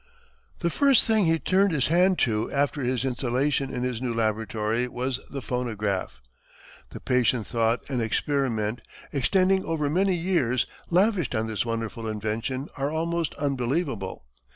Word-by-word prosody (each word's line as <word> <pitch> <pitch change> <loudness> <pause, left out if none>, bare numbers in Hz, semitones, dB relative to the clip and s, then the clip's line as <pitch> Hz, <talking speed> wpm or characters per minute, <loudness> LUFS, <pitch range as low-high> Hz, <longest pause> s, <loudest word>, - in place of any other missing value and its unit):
The 170 -1 +1
first 275 - +4
thing 220 -3 +2
he 165 0 +3
turned 190 +4 +2
his 135 -5 +2
hand 180 +3 +4
to 110 -3 +1
after 145 +1 0
his 125 0 0
installation 130 +2 0
in 125 - -3
his 125 -2 -2
new 120 -3 -2
laboratory 110 +1 0
was 125 +1 -2
the 135 -2 -6
phonograph. 105 - -2 0.7
The - - -8
patient 125 -3 +1
thought 115 0 0
and 130 -4 -1
experiment, 115 -2 0 0.3
extending 190 +6 +3
over 150 -3 -1
many 190 +3 +2
years, 165 -9 +1 0.2
lavished 180 - +2
on 110 0 0
this 110 +1 -2
wonderful 115 0 -3
invention 110 +6 -3
are 140 +1 0
almost 165 0 -1
unbelievable. 135 - -2
130 Hz, 145 wpm, -26 LUFS, 115-165 Hz, 0.7 s, first